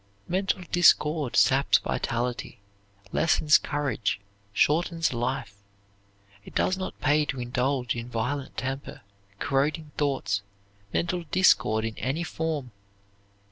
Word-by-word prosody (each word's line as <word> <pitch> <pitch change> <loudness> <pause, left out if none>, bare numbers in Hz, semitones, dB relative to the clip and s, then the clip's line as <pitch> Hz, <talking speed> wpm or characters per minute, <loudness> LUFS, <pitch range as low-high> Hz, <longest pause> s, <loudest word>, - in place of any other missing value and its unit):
Mental 190 0 0
discord 150 -5 +4
saps 135 +1 +5
vitality, 120 -2 -3 0.5
lessens 155 -1 +4
courage, 135 -9 -1 0.3
shortens 165 - +1
life. 120 -2 -2 0.9
It - - -14
does 185 - +2
not 185 0 -6
pay 150 +1 +3
to 130 -2 -4
indulge 125 +1 -1
in 120 +1 -5
violent 130 +4 -3
temper, 135 +1 -4 0.4
corroding 145 +5 0
thoughts, 135 -8 0 0.5
mental 175 +1 -1
discord 115 - +3
in 115 -1 -4
any 140 +7 -1
form. 155 -6 -3
140 Hz, 105 wpm, -27 LUFS, 125-160 Hz, 0.9 s, saps